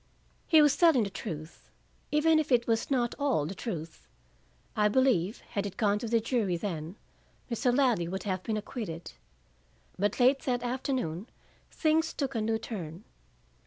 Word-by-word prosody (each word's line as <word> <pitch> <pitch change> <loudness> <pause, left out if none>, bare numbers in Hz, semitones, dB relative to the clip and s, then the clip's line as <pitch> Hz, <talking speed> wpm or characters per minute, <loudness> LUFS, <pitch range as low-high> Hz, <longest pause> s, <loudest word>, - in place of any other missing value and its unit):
He 315 -3 +7
was 295 -2 +4
telling 325 -9 +5
the 200 - -4
truth, 160 -5 -7 0.4
even 315 +1 +4
if 305 -2 -2
it 240 -1 +4
was 225 -1 0
not 245 -4 +1
all 275 - +1
the 170 - -4
truth. 170 -7 -6 0.7
I 210 0 +4
believe, 215 -4 +2
had 200 0 -1
it 195 - -9
gone 205 -2 +2
to 230 - -4
the 230 +1 +3
jury 220 -6 0
then, 165 -2 -4 0.6
Mr. 245 +2 +2
Ladley 245 -9 +2
would 190 +2 -4
have 185 -3 -2
been 215 +2 -2
acquitted. 185 -7 -6 0.9
But, 205 +5 0
late 260 +2 +5
that 245 -2 -1
afternoon, 245 - -2 0.4
things 320 0 +1
took 275 -2 -2
a 225 - -1
new 220 +1 +1
turn. 185 -6 -7
225 Hz, 160 wpm, -29 LUFS, 190-260 Hz, 0.9 s, He